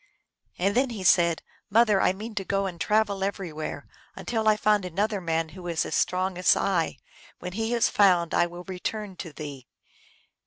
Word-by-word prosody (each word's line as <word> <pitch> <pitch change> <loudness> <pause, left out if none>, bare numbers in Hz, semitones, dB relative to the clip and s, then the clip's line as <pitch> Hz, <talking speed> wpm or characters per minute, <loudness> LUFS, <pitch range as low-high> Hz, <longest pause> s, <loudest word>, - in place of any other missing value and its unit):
And 195 +3 +1
then 260 +3 +2
he 215 -5 -6
said, 170 -2 +4
" - - -40
Mother, 215 -2 +4
I - - +4
mean 215 +4 -7
to 205 -2 -2
go 195 +1 0
and 175 -3 -5
travel 210 -2 +1
everywhere, 180 -6 -4 0.3
until 225 -2 -2
I 215 -1 +5
find 210 -1 +2
another 200 +3 -1
man 165 -1 -1
who 175 +2 -10
is 170 -2 0
as - - -5
strong 185 0 0
as 180 - +5
I. 175 -4 0 0.4
When 180 0 -7
he 225 +3 -1
is 235 - +3
found 180 -5 +3
I 175 - +3
will 175 +1 -9
return 190 +2 -5
to 170 -4 -7
thee." 145 -4 -8
190 Hz, 190 wpm, -26 LUFS, 175-210 Hz, 0.4 s, I